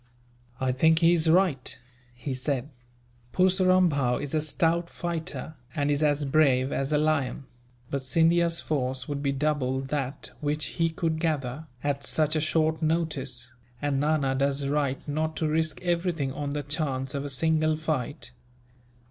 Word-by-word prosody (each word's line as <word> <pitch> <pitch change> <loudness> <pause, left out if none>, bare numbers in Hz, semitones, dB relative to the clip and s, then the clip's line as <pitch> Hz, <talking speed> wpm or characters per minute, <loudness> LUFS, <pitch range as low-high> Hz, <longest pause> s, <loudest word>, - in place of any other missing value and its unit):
"I 130 -1 +1
think 160 +5 +4
he 165 +1 +5
is 165 -1 +2
right," 165 -6 +2 0.4
he 120 +3 -4
said. 130 +1 -2 0.6
"Purseram 185 0 +4
Bhow 135 -6 +1
is 145 0 -5
a 155 - +2
stout 170 +2 +1
fighter, 160 -4 -4 0.2
and 145 -1 +1
is 145 +1 +1
as 145 -1 +2
brave 135 -2 +3
as 135 +2 -1
a 150 - +3
lion; 145 -3 0 0.5
but 140 - -1
Scindia's 165 +4 +3
force 130 -3 -2
would 145 -1 -3
be 140 -1 +1
double 135 -2 0
that 135 0 -3
which 150 +1 -1
he 165 0 +3
could 160 -1 -2
gather, 155 -2 -2 0.2
at 140 -1 -1
such 155 +1 +1
a - - +2
short 155 0 +1
notice, 140 -7 -1 0.3
and 145 0 0
Nana 145 -2 +1
does 140 +1 +1
right 140 -1 -1
not 155 +2 -1
to 160 - 0
risk 155 +1 0
everything 170 -5 0
on 145 0 -3
the 145 0 -3
chance 140 -3 -2
of 140 -1 -2
a 145 - -4
single 155 +3 +2
fight. 150 -3 -3
150 Hz, 160 wpm, -27 LUFS, 135-160 Hz, 0.6 s, he